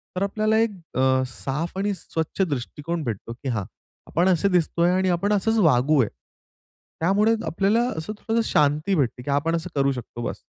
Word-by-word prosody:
तर 185 - 0
आपल्याला 215 +2 +1
एक 230 - +3 0.3
अ, 130 0 +3
साफ 150 +8 -4
आणि 200 +1 0
स्वच्छ 160 0 -4
दृष्टिकोन 155 +1 -2
भेटतो 115 -1 -4
की 130 +2 -6
हां, 105 -4 -1 0.4
आपण 175 +3 +1
असे 185 +2 +3
दिसतो 170 -1 +1
आहे 175 +1 +4
आणि 185 0 +2
आपण 200 +4 +1
असंच 225 +3 +1
वागूया. 140 - +4 0.9
त्यामुळे 205 +6 +3
आपल्याला 200 +6 +1 0.2
असं 160 +7 -4
थोडसं 230 +1 0
शांती 150 +6 +2
भेटते 125 -4 0
की 145 - -6
आपण 160 +4 +1
असं 165 - -4
करू 140 -1 +2
शकतो 120 -2 -7
बस. - - -5
165 Hz, 175 wpm, -24 LUFS, 135-195 Hz, 0.9 s, आहे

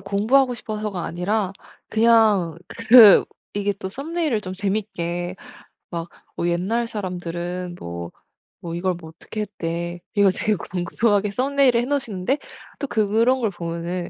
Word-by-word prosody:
공부하고 225 +7 +2
싶어서가 210 -5 -4
아니라 190 +3 -1 0.4
그냥 220 -7 +3 0.3
그 225 -4 +9 0.3
이게 205 0 0
또 190 - -6
썸네일을 290 - -2
좀 185 -2 -6
재밌게 190 -3 -3 0.5
막 170 0 -5 0.3
"어 170 - -1
옛날 195 +8 0
사람들은 180 -3 -4
뭐, 85 0 -6 0.5
뭐 170 -1 -6
이걸 185 +1 0
뭐 160 -2 -11
어떻게 170 +6 -7
했대." 170 -4 -4
이걸 200 -2 +5
되게 215 - +1
궁금하게 200 +4 0
썸네일을 260 0 +2
해 - - -2
놓으시는데 265 -3 -1 0.4
또 280 - -2
그런 225 +4 +2
걸 225 -4 +1
보면은 170 0 -4
200 Hz, 290 characters per minute, -22 LUFS, 175-225 Hz, 0.5 s, 그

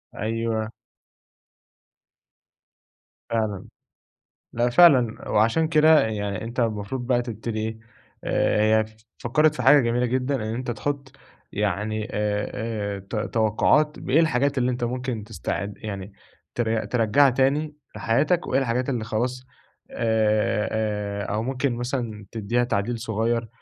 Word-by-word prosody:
أيوه. 110 0 -2 2.6
فعلًا، 110 -4 -1 0.9
لأ 120 +1 +1
فعلًا، 125 -6 +4
وعشان 115 +10 +3
كده 155 0 +6
يعني 105 -2 -3
أنت 120 +2 -5
المفروض 115 +2 -2
بقى 125 -2 +2
تبتدي 115 -1 -5
إيه 110 0 -4 0.4
آآ، 110 +1 +2
هي - - -3 0.3
فكّرِت 150 +5 +2
في 125 - -3
حاجة 140 +4 +7
جميلة 120 0 +1
جدًا 130 +3 0
إن 120 - -3
أنت 115 +3 -3
تحط 140 +3 -4 0.4
يعني 105 +2 -2
آآ، 105 0 -1 0.4
آآ، 100 - -7
ت 100 +4 -8 0.2
توقعات 115 +7 +2
بإيه 140 +5 +2
الحاجات 140 -3 +2
اللي 125 0 +2
أنت 120 0 -3
ممكن 125 -2 -3
تستعد 105 -1 -4
يعني 100 -1 -7 0.4
ت 120 - 0 0.3
ترجعها 125 +4 +4
تاني 140 +4 +1 0.2
لحياتك 150 +10 +1
وإيه 135 - +2
الحاجات 125 0 -1
اللي 120 -5 -1
خلاص، 125 +4 -2 0.5
آآ، 110 -2 +1
آآ، 105 -2 -2
أو 110 +1 -1
ممكن 130 0 -1
مثلًا 120 -4 -4
تديها 115 +2 0
تعديل 115 0 -1
صغيّر، 115 +1 -1
115 Hz, 125 wpm, -24 LUFS, 110-130 Hz, 2.6 s, حاجة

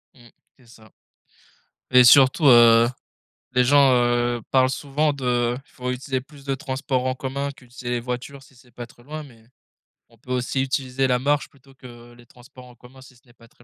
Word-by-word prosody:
Mmh 120 -2 -19 0.3
c'est 125 - -23
ça 110 -1 -19 1.0
et 125 0 +7
surtout, 135 +4 +5
heu, 120 -2 +6 0.7
les 125 0 +2
gens, 140 0 +4
heu, 120 0 0
parlent 130 -1 +3
souvent 145 +2 -1
de 125 -3 -1
«faut 125 -1 -7
utiliser 130 +1 -4
plus 140 +1 -18
de 135 -1 -2
transport 130 -1 -3
en 130 - -1
commun 140 +2 -5
qu'utiliser 125 -2 -10
les 120 -1 -1
voitures 125 +3 -7
si 135 - -21
c'est 125 0 -22
pas 120 0 -9
trop 120 - -22
loin» 155 +4 -8
mais 115 -5 -19 0.7
on - - -24
peut 125 - -12
aussi 125 +1 -2
utiliser 135 0 -2
la 125 -1 +1
marche 145 +3 -1
plutôt 135 -1 -23
que 120 -2 -15
les 120 0 -19
transports 125 +2 -17
en 125 -1 -17
commun 125 +2 -18
si 130 -1 -17
ce 120 - -25
n'est 120 - -23
pas 115 -1 -21
très 120 - -25
125 Hz, 200 wpm, -22 LUFS, 120-135 Hz, 1.0 s, et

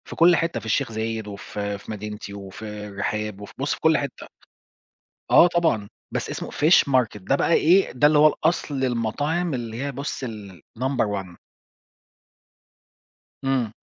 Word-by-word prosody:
في - - -9
كل 170 +1 +6
حتّة، 165 +1 -1
في - - -13
الشيخ 110 +1 0
زايد، 110 0 -3
وفي 100 0 -5
في 100 - -10
مدينتي 105 -1 -6
وفي 100 +3 -9 0.2
الرحاب، 105 +1 -3
وفي 100 - -10
بُص 140 +2 -1
في - - -7
كل 160 -1 +4
حتّة. 140 -3 -5 1.0
آه 175 - +8
طبعًا، 160 -13 +1 0.2
بس - - -3
اسمه - - -5
Fish 155 +4 +5
Market 125 -5 +2
ده 100 +9 +1
بقى 170 - +2
إيه؟ 180 +5 +4
ده 145 +3 +4
اللي 150 0 +4
هو 155 - +8
الأصل 150 -3 0
المطاعم 145 +8 -1
اللي 120 -1 -4
هي 140 - -2
بُص 140 0 -4
الnumber 110 - -4 0.2
1. 90 -2 -14 2.1
إمم. 130 -5 +1
120 Hz, 155 wpm, -24 LUFS, 105-150 Hz, 2.1 s, آه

